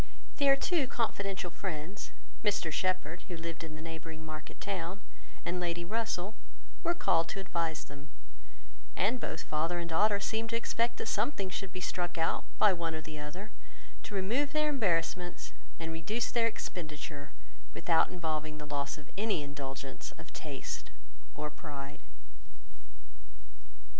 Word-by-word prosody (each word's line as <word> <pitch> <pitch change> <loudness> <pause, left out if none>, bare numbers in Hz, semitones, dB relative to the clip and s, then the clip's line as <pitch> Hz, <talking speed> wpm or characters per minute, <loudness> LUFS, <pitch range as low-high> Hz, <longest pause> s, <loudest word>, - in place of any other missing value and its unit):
Their 275 -1 +8
two 300 -1 +3
confidential 195 -7 0
friends, 180 +2 -3 0.3
Mr 205 -6 +3
Shepherd, 180 -1 +1
who 175 - -3
lived 165 0 -4
in 155 -1 -5
the 155 - -7
neighbouring 160 -1 -5
market 155 -1 -6
town, 190 -1 -2 0.5
and 180 +1 +1
Lady 175 -1 0
Russell, 215 -1 0 0.5
were 340 +1 +3
called 165 - +4
to - - -2
advise 170 -4 0
them; 140 0 -10 0.9
and 230 +6 +3
both 160 - -2
father 165 +3 +1
and 170 -1 -1
daughter 200 +5 +5
seemed 220 +3 0
to 230 - +1
expect 235 0 +2
that - - -2
something 200 -5 +1
should 195 0 -2
be 185 - -4
struck 175 -1 0
out 165 0 +2
by 210 -2 +8
one 165 -2 0
or 160 - -2
the 155 -1 -6
other 180 +9 -5 0.5
to 205 - -6
remove 245 +10 +2
their 305 0 +4
embarrassments 175 - +1 0.3
and 165 0 -2
reduce 210 +9 0
their 230 -1 +5
expenditure, 150 -7 -4 0.4
without 165 -2 +5
involving 155 -3 -1
the 150 - -5
loss 145 0 -1
of 150 - -12
any 210 -8 +3
indulgence 135 -2 -4
of - - -11
taste - - -4 0.5
or 150 0 -2
pride. 145 -2 -6
175 Hz, 150 wpm, -34 LUFS, 155-205 Hz, 0.9 s, Their